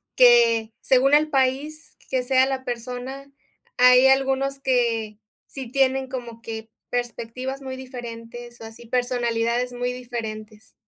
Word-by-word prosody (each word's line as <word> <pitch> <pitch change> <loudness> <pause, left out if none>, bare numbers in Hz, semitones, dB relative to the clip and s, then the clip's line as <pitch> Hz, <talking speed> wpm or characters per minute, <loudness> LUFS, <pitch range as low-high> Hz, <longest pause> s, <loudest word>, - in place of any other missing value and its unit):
que 230 -3 +5
según 270 +2 +3
el 305 +1 +5
país 280 +3 -1
que 260 -1 +1
sea 260 +1 +4
la 265 -1 -3
persona, 250 +3 -6 0.5
hay 250 +1 +7
algunos 270 +1 +2
que 230 -5 0 0.3
sí 260 -3 -8
tienen 265 -1 +2
como 240 -3 -7
que 225 -1 -7 0.2
perspectivas 245 +2 -4
muy 265 -1 -6
diferentes, 240 -2 -9
o - - -7
así 225 +1 -11
personalidades 245 0 0
muy 245 0 -2
diferentes. 220 -3 -7
250 Hz, 125 wpm, -23 LUFS, 235-265 Hz, 0.5 s, hay